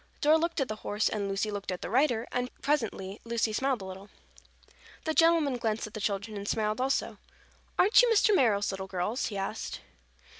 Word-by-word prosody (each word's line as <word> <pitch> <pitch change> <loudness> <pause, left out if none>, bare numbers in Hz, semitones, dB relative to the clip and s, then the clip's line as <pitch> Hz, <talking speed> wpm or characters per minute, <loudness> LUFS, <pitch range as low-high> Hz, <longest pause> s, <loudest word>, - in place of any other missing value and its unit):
Dora 310 +2 +4
looked 335 0 -1
at 270 - +1
the 215 - -5
horse 210 0 0
and 200 -2 -2
Lucy 195 +2 -1
looked 200 -2 -4
at 180 - -5
the - - -4
rider 245 -2 +2
and 250 0 -1
presently 220 -8 -1
Lucy 230 -1 -1
smiled 260 -2 0
a - - -7
little. 190 +2 -9 0.9
The 315 - -1
gentleman 325 -5 +4
glanced 225 -2 -1
at 215 - -10
the 215 - -6
children 200 +1 -2
and 200 0 -6
smiled 215 +1 0
also. 270 +1 -1 0.6
"Aren't 415 +6 +6
you - - +3
Mr. 425 -1 +4
Merrill's 205 - +3
little 190 0 -5
girls?" 190 +7 -2
he 205 - -5
asked. 195 0 -4
220 Hz, 195 wpm, -29 LUFS, 200-275 Hz, 0.9 s, Aren't